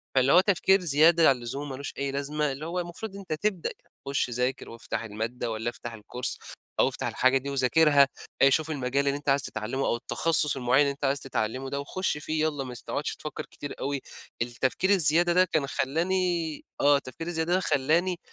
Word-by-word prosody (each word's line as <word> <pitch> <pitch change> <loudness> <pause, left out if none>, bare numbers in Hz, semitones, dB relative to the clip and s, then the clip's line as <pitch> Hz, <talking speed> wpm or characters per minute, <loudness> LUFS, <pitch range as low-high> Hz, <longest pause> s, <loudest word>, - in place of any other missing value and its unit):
فاللي 130 +1 +4
هو 180 - +8
تفكير 195 0 +3
زيادة 160 0 +5
عن 135 - +4
اللزوم، 135 +4 -5
مالوش 135 +1 -6
أي 140 0 -2
لازمة، 145 +1 -1
اللي 145 +4 -6
هو 175 +2 -3
المفروض 185 +4 -6
أنت 195 -5 -5
تبدأ 185 +2 -1
ك - - -20 0.2
خُش 140 -2 0
ذاكر 125 +3 -2
وافتح 115 -1 -5
المادة 115 +2 -4
والّا 110 +2 -2
افتح 120 0 -8
الكورس 125 +4 -3 0.4
أو - - +5
افتح - - -4
الحاجة 130 +1 +2
دي 140 +2 -5
وذاكرها، 140 +1 +4 0.3
آآ 135 - +7
شوف 155 +3 +1
المجال 140 0 -1
اللي 140 +1 +1
أنت 145 -1 -4
عايز 140 0 +3
تتعلمه، 120 +5 -3
أو - - +1
التخصص 150 +5 +3
المُعيّن 130 +3 +3
اللي 140 -1 +2
أنت 140 - -4
عايز 135 +1 +1
تتعلمه 130 +1 -3
ده، 140 - -3
وخُش 170 +3 -2
فيه 155 +1 -2
يالّا، 145 -3 -2
ما 125 -1 -7
س - - -11
تقعدش 145 - -3
تفكر 155 - -7
كتير 145 - -8
أوي. 140 0 -2 0.4
التفكير 125 +9 -1
الزيادة 175 -2 +5
ده 185 +1 +5
كان 155 -5 -1
خلّاني 170 +2 -1 0.2
آه، 145 0 +5
التفكير 140 +5 -8
الزيادة 165 0 -1
ده 185 - +3
خلّاني 165 +4 +1
140 Hz, 200 wpm, -27 LUFS, 130-165 Hz, 0.4 s, هو